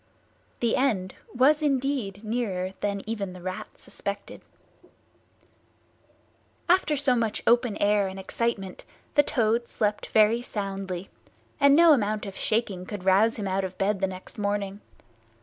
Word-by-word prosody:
The 235 -1 +2
end 210 -9 0 0.2
was 280 +5 +4
indeed 265 -8 -1
nearer 210 -5 -2
than 200 -1 -2
even 205 -4 -4
the 180 - -11
Rat 185 0 -6
suspected. - - -6 2.3
After 345 -4 +3
so 270 -2 +3
much 225 -3 -1
open 235 -2 +3
air 205 -1 +2
and 190 0 -7
excitement 195 -1 -3 0.3
the 290 - +6
Toad 235 -4 0
slept 210 -1 -1
very 220 +2 +4
soundly, 195 -5 -5 0.5
and 280 0 +6
no 335 0 +7
amount 215 -5 0
of 195 -1 -7
shaking 200 -5 -1
could 205 -4 -6
rouse 205 +5 +4
him 205 -3 -4
out 190 +1 0
of 185 -1 -5
bed 195 0 0
next 185 +1 -4
morning. 205 0 -2
210 Hz, 135 wpm, -26 LUFS, 195-240 Hz, 2.3 s, no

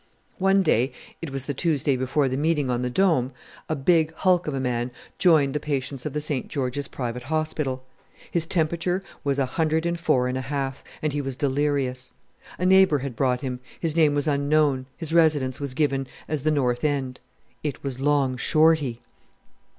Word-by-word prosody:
One 195 +1 +4
day 130 -5 +2 0.3
it 165 - -4
was 135 -1 -3
the 145 - -2
Tuesday 145 -2 +1
before 130 +3 +1
the 130 - -1
meeting 145 -2 +1
on 120 0 0
the 125 - -1
Dome 140 -5 +2 0.4
a 155 - +1
big 160 +2 +3
hulk 180 -1 +2
of 150 - -1
a - - -1
man 125 -1 -1 0.3
joined 155 -6 +4
the 150 - 0
patients 140 -2 -3
of 145 - -6
the 150 - -1
St. 145 -3 -1
George's 135 0 -2
Private 125 -1 -4
Hospital. 150 -2 -2 0.5
His 170 -2 0
temperature 170 +3 0 0.2
was 140 -1 0
104½, 140 -3 0 0.3
and 155 -2 0
he 145 - -1
was 135 -2 -4
delirious. 140 -3 -1 0.4
A 180 - -1
neighbour 190 -4 +6
had 135 -3 -5
brought 125 -1 +1
him; 130 -3 -4 0.2
his 165 -2 -1
name 155 -3 +4
was 145 - 0
unknown, 140 -2 +2
his 165 -2 -4
residence 150 -6 +3
was 140 -3 -4
given 140 -3 0 0.2
as 155 -2 -2
the 155 - +1
North 125 -5 +1
End. 135 -4 -1 0.4
It 150 -3 -4
was 135 -2 -4
Long 135 -2 +2
Shorty! 155 -3 +2
145 Hz, 170 wpm, -25 LUFS, 130-155 Hz, 0.5 s, neighbour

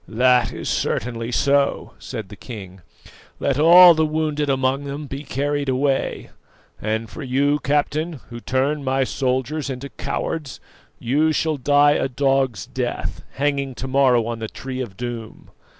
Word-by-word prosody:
"That 125 +1 +3
is - - -6
certainly 115 0 -2
so," 140 +2 +1
said 110 -6 -7
the - - -10
king. 95 -6 -10 0.6
"Let 140 0 0
all 175 +3 +9
the 160 0 +1
wounded 155 -1 -1
among 135 +1 0
them 140 +2 -5
be 135 0 -6
carried 145 0 -2
away; 135 +1 -1 0.5
and 110 +1 -2
for 155 - -9
you, 140 +2 +1
captain, 150 +4 0 0.2
who 120 - -6
turn 135 +4 -1
my 135 0 +1
soldiers 130 +3 -1
into 135 +1 -5
cowards, 150 -2 -4 0.4
you 150 +6 +1
shall 155 0 0
die 145 +2 +4
a 135 - 0
dog's 135 -5 0
death, - - -4
hanging 140 -2 -1
to 130 - -5
morrow 130 -3 +3
on 115 0 -4
the 110 - -4
Tree 130 -1 -6
of 100 -7 -7
Doom. 120 -2 -7
135 Hz, 150 wpm, -22 LUFS, 125-145 Hz, 0.6 s, all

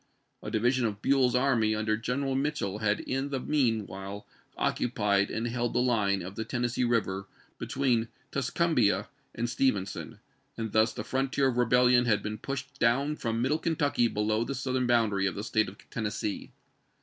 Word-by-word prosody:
A - - -5
division 120 +3 +2
of 105 -2 -5
Buell's 130 -3 +3
army 120 -5 +2
under 110 0 0
Greneral 130 +4 -2
Mitchel 135 -8 -1
had 105 -1 +1
in 135 +2 -2
the 135 -2 -2
mean 125 -7 +1
while 95 +2 -7 0.3
occupied 105 -5 +1
and 115 - -2
held 120 0 -1
the - - +2
line 105 -6 +1
of 95 +2 -7
the 110 - -3
Ten 120 +2 -3
nessee 120 +1 0
River 100 -5 0 0.3
between 125 -4 0 0.2
Tuscumbia 140 -4 +1 0.3
and 120 - -1
Stevenson; 115 -6 -1 0.4
and 110 -2 -3
thus 110 +1 +3
the 105 - -5
frontier 135 +2 +1
of 120 - -3
rebellion 125 0 +4
had 110 -3 +2
been 105 0 -4
pushed 135 +2 -6
down 135 +6 +2
from 115 -3 -2
middle 150 +5 +1
Kentucky 145 -7 +1
below 110 0 0
the 140 +3 -4
southern 130 -1 -1
boundary 110 -5 +2
of 95 - -3
the 100 - -4
State 110 -2 +1
of 100 - -14
Tennessee. 105 -2 -3
120 Hz, 175 wpm, -29 LUFS, 105-130 Hz, 0.4 s, rebellion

